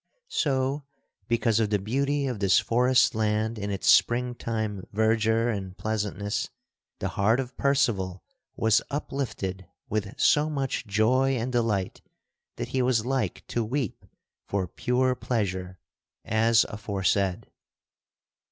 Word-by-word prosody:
So, 140 - 0 0.4
because 115 -2 +2
of 110 -2 +1
the 105 - +2
beauty 140 +8 0
of 125 -6 -3
this 100 -1 +4
forest 125 +2 +3
land 110 0 0
in 100 0 -3
its 100 -1 -3
spring 125 +1 +4
time 110 -5 -3
verdure 110 +2 +2
and 95 -1 -7
pleasantness, 105 0 -2 0.5
the - - -2
heart 110 +5 +2
of 130 -1 -4
Percival 115 -10 +1 0.3
was 110 0 +3
uplifted 110 - -4 0.2
with 105 -1 -3
so 150 +1 +4
much 135 -5 -2
joy 125 +6 +2
and 125 +1 -2
delight 115 -6 -1 0.5
that - - -5
he 130 - 0
was 125 -3 +2
like 135 0 -2
to 120 - 0
weep 125 0 -3 0.4
for 95 -2 -1
pure 125 +7 +1
pleasure 95 -7 -2 0.5
as 115 +1 +4
aforesaid. 100 -1 -1
110 Hz, 125 wpm, -27 LUFS, 100-125 Hz, 0.5 s, this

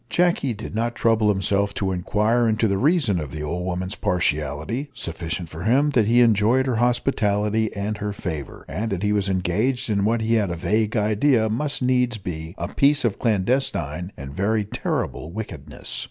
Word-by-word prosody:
Jacky 170 -8 +1
did 110 - -8
not 115 +2 -1
trouble 110 -2 +2
himself 100 0 +1
to 95 -1 -1
inquire 105 +6 +1
into 110 +1 +2
the 100 -1 0
reason 140 - +2
of 75 -3 -5
the 75 +2 -6
old 85 +4 -3
woman's 90 +1 -2
partiality 85 - -1
sufficient 85 -3 -4
for 80 +1 -8
him 140 +6 +3
that 115 -6 +3
he 120 +2 +5
enjoyed 115 +3 +4
her 125 -4 0
hospitality 110 -3 +1
and 105 +2 -3
her 105 0 -2
favour, 80 -8 -6
and 115 +1 -3
that 95 0 -2
he 105 0 +2
was 100 -2 0
engaged 110 +8 0
in 100 -1 +1
what 115 +2 +1
he 110 +1 +1
had 105 -4 +2
a 85 - -2
vague 105 +6 0
idea 110 +2 +2
must 140 +5 0
needs 125 -2 +2
be 85 -3 -6
a - - -3
piece 140 -1 +3
of 110 - 0
clandestine 95 - 0
and 70 0 -7
very 105 +4 0
terrible 85 -5 -3
wickedness. 75 -8 -6
105 Hz, 185 wpm, -23 LUFS, 90-120 Hz, -, he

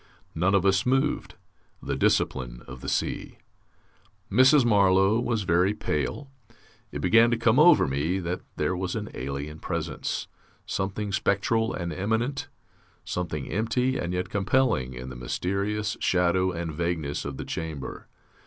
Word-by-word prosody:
None 90 +5 +2
of 100 -1 +2
us 95 0 +3
moved. 135 +3 0 0.4
The - - -3
discipline - - 0
of 65 0 -9
the - - -4
sea! - - -2 0.9
Mrs. 130 +5 +6
Marlow 100 -1 +4
was 120 -3 -1
very 90 +3 +2
pale. 135 - -3 0.6
It - - -5
began 115 +6 +6
to 120 - +1
come 115 +2 +3
over 175 +3 +7
me 75 +7 0
that 90 0 -3
there 90 - 0
was 90 +2 -3
an 105 -2 -4
alien 70 +4 -5
presence, - - -3 0.4
something 100 +2 -3
spectral 110 +3 +1
and 85 -3 -4
immanent, 110 - -1 0.6
something 80 -6 -3
empty 125 +5 0
and 85 - -2
yet 90 0 -2
compelling, 100 - +1
in 65 +1 -7
the 65 - -8
mysterious 100 - -2
shadow 90 +1 +2
and 85 -2 -4
vagueness 80 -3 -2
of 70 -2 -5
the - - -5
chamber. 80 -5 -6
95 Hz, 145 wpm, -26 LUFS, 80-110 Hz, 0.9 s, over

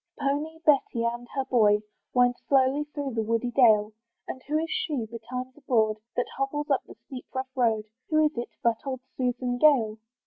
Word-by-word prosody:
The - - -8
pony, 295 +3 -1
Betty, 275 -5 +3
and 240 +1 -3
her 270 -1 0
boy, 210 -4 +3 0.3
Wind 245 0 +4
slowly 275 +2 +3
through 290 -3 -5
the 225 - 0
woody 230 +2 -1
dale: 220 -4 +4 0.3
And 260 - -6
who 300 +1 +1
is 320 +1 -1
she, 315 - -1
be 230 +1 -8
times 255 +1 -5
abroad, 225 -7 +1 0.2
That 245 - +1
hobbles 295 +2 -2
up 275 - +3
the - - -12
steep 255 -2 -8
rough 260 +1 -4
road? 225 -4 +1 0.2
Who 310 0 +4
is 305 - 0
it, 240 0 -4
but 230 -1 +3
old 260 -2 -4
Susan 245 -1 -1
Gale? 235 -8 +4
255 Hz, 195 wpm, -27 LUFS, 235-285 Hz, 0.3 s, Wind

